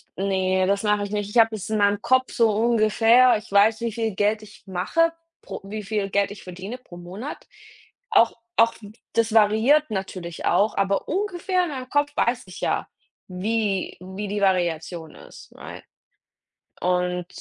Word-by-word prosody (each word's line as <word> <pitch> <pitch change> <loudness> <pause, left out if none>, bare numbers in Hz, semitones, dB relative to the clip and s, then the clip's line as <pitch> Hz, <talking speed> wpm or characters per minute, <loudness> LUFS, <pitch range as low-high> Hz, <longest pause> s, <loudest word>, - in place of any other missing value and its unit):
ne, 190 -1 +1
das 200 +1 +1
mache 210 -1 +1
ich 205 - -6
nicht. 205 -1 -2
Ich 235 - -3
habe 225 -1 +5
es 210 +1 -6
in 215 - 0
meinem 205 0 +2
Kopf 260 0 +2
so 230 -2 +3
ungefähr, 230 +2 +4
ich 215 -1 -12
weiß, 215 +3 +4
wie 235 - -1
viel 220 -2 -3
Geld 210 +1 +1
ich 210 -2 -15
mache 330 - +1 0.3
pro - - -8
wie 210 +2 -6
viel 200 -1 -2
Geld 200 0 +1
ich 205 - -10
verdiene 185 +7 -7
pro 180 -8 -14
Monat. 190 +11 -8 0.6
Auch 230 - +5 0.2
auch 230 0 +5 0.4
das 225 -1 +1
variiert 225 +7 +4
natürlich 185 -4 -5
auch, 205 +5 +2
aber 195 0 0
ungefähr 370 -2 -1
in 350 - -3
meinem 255 -2 -6
Kopf 290 0 +1
weiß 245 +1 0
ich 185 - -11
ja, - - -1 0.4
wie 195 +1 -2
wie 190 +3 -6
die 205 0 -2
Variation 170 -3 -1
ist, - - -14
right? - - -10 1.0
und 180 -1 0
210 Hz, 170 wpm, -23 LUFS, 190-230 Hz, 1.0 s, habe